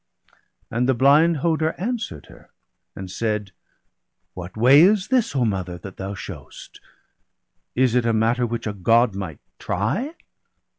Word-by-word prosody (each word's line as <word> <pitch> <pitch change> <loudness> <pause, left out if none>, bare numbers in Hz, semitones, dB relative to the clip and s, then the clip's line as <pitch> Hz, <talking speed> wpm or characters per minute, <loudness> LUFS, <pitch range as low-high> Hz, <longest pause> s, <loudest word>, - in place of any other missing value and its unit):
And 125 +3 0
the 130 - +3
blind 150 +6 +4
Hoder 160 -1 +1
answer'd 215 - -4
her, - - -17 0.5
and 95 -1 -7
said: 105 -2 -2 0.3
— - - -54
' - - -53
What 90 +2 -9
way 130 +6 +7
is 195 +2 +4
this, 250 - +1
O 125 -3 +2
mother, 95 -4 -3
that 95 +2 -11
thou 95 +1 -5
shew'st? 90 -7 -10 1.0
Is 125 -2 +2
it 125 -1 +2
a - - +3
matter 115 +2 +1
which 115 0 -4
a 105 - -2
God 115 +4 +3
might 95 -6 -6 0.2
try?' 205 - -2
115 Hz, 155 wpm, -22 LUFS, 100-150 Hz, 1.0 s, way